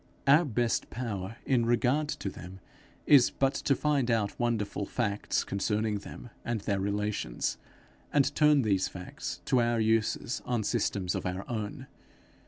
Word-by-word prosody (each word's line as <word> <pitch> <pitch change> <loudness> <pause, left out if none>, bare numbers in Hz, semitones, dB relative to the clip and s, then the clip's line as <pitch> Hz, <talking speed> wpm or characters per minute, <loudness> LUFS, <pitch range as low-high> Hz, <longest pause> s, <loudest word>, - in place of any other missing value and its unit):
Our 145 +5 +6
best 120 -3 0
power 110 -4 -4
in 120 -3 +2
regard 125 +6 +2
to 95 - -3
them 90 +1 -10 0.5
is 140 -5 +7
but 135 0 +1
to 140 - +1
find 140 -5 +1
out 110 -3 0
wonderful 110 -4 -1
facts 105 -4 -1
concerning 105 +1 -1
them 115 - -10
and 120 -1 -2
their 100 0 -1
relations, 100 - -2 0.5
and 145 -2 +3
turn 150 -3 +4
these 100 -4 +2
facts 90 -1 -7
to 125 - +3
our 120 0 +1
uses 110 +2 +1
on 120 -3 -1
systems 100 -4 0
of - - -3
our 90 +2 -4
own. 115 +3 -4
115 Hz, 150 wpm, -29 LUFS, 100-125 Hz, 0.5 s, is